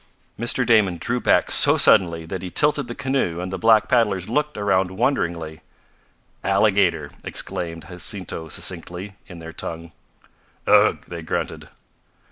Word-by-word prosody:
Mr. 120 +2 +2
Damon 105 -7 +3
drew 120 +9 -1
back - - +2
so - - +5
suddenly 85 -3 +4
that 95 +2 -6
he 95 - -6
tilted 145 +3 +2
the 120 - -7
canoe, 130 -11 -1
and 90 +1 -5
the - - -2
black 110 +2 +4
paddlers 105 -7 +1
looked 150 +4 -1
around 95 -2 +1
wonderingly. 85 - -1 0.8
"Alligator," 100 -2 +2
explained 85 -2 -4
Jacinto 90 -2 -5
succinctly, 90 +4 -4
in 90 - -11
their 80 0 -9
tongue. 85 0 -7 0.7
"Ugh!" - - +4
they 85 -1 -7
grunted. 80 - -4
95 Hz, 135 wpm, -22 LUFS, 85-115 Hz, 0.8 s, so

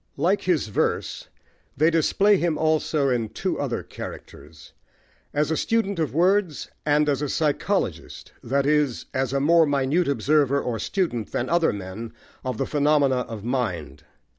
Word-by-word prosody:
Like 185 +7 +2
his 170 -11 0
verse, 100 - -1 0.5
they 155 +4 +4
display 195 +5 +3
him 170 -3 0
also 155 -2 +1
in 120 -3 0
two 110 - -3
other - - -2
characters 75 +2 -10 0.6
as 150 +2 0
a - - +2
student 200 -1 0
of 155 -3 0
words, 180 0 +1 0.2
and 150 0 +3
as 140 -1 +1
a 145 - -2
psychologist, 145 - -2
that 140 +3 0
is, 150 -4 +1
as 130 0 -1
a 140 - +1
more 165 +3 +4
minute 145 +5 +1
observer 140 0 +2
or 120 -4 -3
student 160 - -2
than 120 - -1
other 170 -1 +3
men 100 +3 -7 0.3
of 130 -3 -3
the - - -1
phenomena 145 -2 +2
of 115 -4 -5
mind. 90 - -3
145 Hz, 155 wpm, -24 LUFS, 125-160 Hz, 0.6 s, they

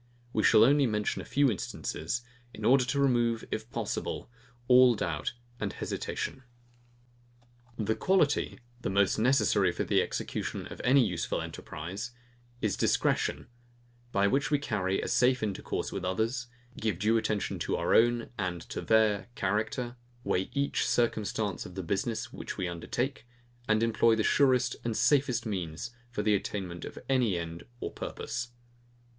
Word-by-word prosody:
We 110 - +2
shall 105 - +6
only 140 +2 +5
mention 105 -2 -1
a - - -9
few 140 -2 +3
instances, 100 +2 -3 0.3
in - - -5
order 130 0 +5
to 140 +3 -1
remove, 120 -4 +2
if 110 +1 -3
possible, 120 - -3 0.4
all 125 -1 +7
doubt 80 -4 -2 0.3
and - - -2
hesitation. 130 - -4 1.4
The 110 0 +1
quality, 155 -3 +2 0.2
the - - -2
most 100 +2 +2
necessary 120 -3 +3
for - - -2
the - - +3
execution - - -3
of - - -9
any 130 0 +5
useful 90 -5 -1
enterprise, 95 +10 -6 0.5
is 105 -3 +1
discretion; - - +1 0.7
by 100 -2 +2
which 135 +7 +2
we 145 - +3
carry 100 -9 -1
on - - -3
a - - -3
safe 125 0 +3
intercourse 100 -3 -2
with 95 - -4
others, 110 +7 -1 0.3
give 110 -5 -1
due 110 +4 +3
attention 110 -2 -1
to - - -1
our - - +1
own 120 0 +3
and 90 -4 -2
to - - -4
their 110 -2 +3
character, 115 +5 -1 0.3
weigh 95 -4 0
each 140 0 0
circumstance 110 -4 0
of 90 - -12
the 95 - -4
business 100 +6 -2
which - - -6
we 90 - -1
undertake, 120 +10 -3 0.4
and 110 +1 +3
employ 115 0 +4
the 110 - +1
surest 125 -2 +3
and 115 -2 -1
safest 140 -4 +3
means 90 0 -4 0.2
for 110 -3 -3
the 105 0 +3
attainment 95 -3 -3
of - - -9
any 125 -8 +2
end 85 0 -6
or - - -4
purpose. 120 0 -4
110 Hz, 155 wpm, -30 LUFS, 100-125 Hz, 1.4 s, all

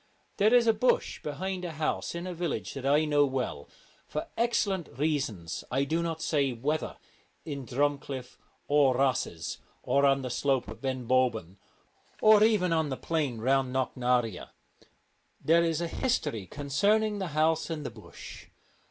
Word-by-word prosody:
There 210 +2 +4
is 245 -1 +5
a 225 - +5
bush 245 +4 +1
behind 180 +5 -4
a 170 -2 -4
house 155 +2 -2
in 170 +1 -4
a 185 - -4
village 160 - -3
that 135 -1 -4
I 150 +3 +4
know 145 -1 +3
well: 130 - -3 0.4
for 150 - -4
excellent 205 -6 0
reasons 130 - -2
I 135 +2 +1
do 160 +4 0
not 165 -1 -3
say 140 -4 +1
whether 145 +7 -2 0.5
in 140 -5 -6
Drumcliff 140 -1 -2 0.3
or 145 -3 +4
Rosses 130 -11 -1 0.2
or 140 - +2
on 135 -1 +2
the 125 - -4
slope 135 0 0
of - - -10
Ben 130 -2 -3
Bulben, 115 -8 +1 0.6
or 215 -1 +7
even 205 -6 +3
on 160 -2 +1
the 130 - -3
plain 150 -7 -1
round 130 +1 +2
Knocknarea. 125 -5 0 0.9
There 170 +2 +4
is 165 -1 0
a 170 - -1
history 140 - -1
concerning 205 +9 +1
the 190 - -2
house 160 +1 +2
and 155 -3 -4
the - - -4
bush. - - -12
145 Hz, 160 wpm, -29 LUFS, 130-170 Hz, 0.9 s, or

